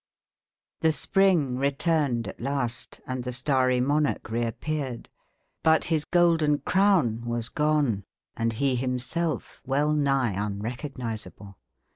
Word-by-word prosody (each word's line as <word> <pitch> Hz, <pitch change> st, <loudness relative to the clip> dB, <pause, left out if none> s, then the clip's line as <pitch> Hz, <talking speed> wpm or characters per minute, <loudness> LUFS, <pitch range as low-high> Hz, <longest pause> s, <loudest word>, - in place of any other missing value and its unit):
The 160 Hz, -1 st, +3 dB
spring 175 Hz, -10 st, +2 dB
returned 140 Hz, -4 st, +1 dB
at -, -, -8 dB
last, 125 Hz, -2 st, -3 dB
and 130 Hz, -1 st, -4 dB
the 125 Hz, -, -3 dB
starry 130 Hz, -1 st, +1 dB
monarch 145 Hz, -2 st, 0 dB
reappeared, 120 Hz, +3 st, -3 dB, 0.5 s
but 160 Hz, 0 st, +4 dB
his 155 Hz, -3 st, 0 dB
golden 165 Hz, -4 st, +3 dB
crown 185 Hz, -, +2 dB
was 120 Hz, 0 st, -2 dB
gone, 150 Hz, -10 st, +1 dB, 0.3 s
and 115 Hz, 0 st, 0 dB
he 135 Hz, +3 st, +1 dB
himself 130 Hz, +7 st, -2 dB
well 145 Hz, +3 st, +1 dB
nigh 135 Hz, -5 st, +2 dB
unrecognisable. 110 Hz, 0 st, -5 dB
135 Hz, 110 wpm, -26 LUFS, 120-150 Hz, 0.5 s, but